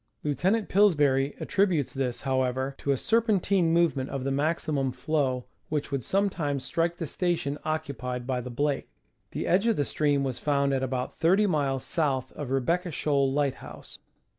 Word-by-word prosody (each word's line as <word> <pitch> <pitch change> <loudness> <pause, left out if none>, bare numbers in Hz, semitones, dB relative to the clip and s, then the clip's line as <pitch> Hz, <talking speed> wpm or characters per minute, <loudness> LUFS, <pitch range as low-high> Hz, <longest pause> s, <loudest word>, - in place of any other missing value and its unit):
Lieutenant 185 - +1
Pillsbury 145 -9 +3
attributes 185 -8 +1
this, 130 -3 -2
however, 130 0 0
to - - -5
a 135 - +2
serpentine 200 - +2
movement 165 -6 +2
of 135 -2 -4
the 135 - -1
maximum 145 -2 0
flow, 130 -3 -1 0.2
which 150 -1 -2
would 135 -3 -1
sometimes 170 -9 0
strike 170 +1 -1
the 165 - -3
station 160 -4 -1
occupied 140 -6 -3
by 130 -1 -1
the 125 - -7
Blake. 140 +3 -1 0.4
The - - -4
edge 195 +6 +2
of 230 - +3
the 145 - 0
stream 145 -1 +1
was 130 -3 -2
found 140 -1 +1
at 135 - 0
about 130 -1 -2
30 190 +6 +3
miles 140 -8 0
south 140 -6 0
of 145 -4 -6
Re 135 0 +1
becca 175 +7 0
Shoal 140 -3 +1
light 140 -1 +1
house. - - -11
145 Hz, 170 wpm, -27 LUFS, 135-170 Hz, 0.4 s, Pillsbury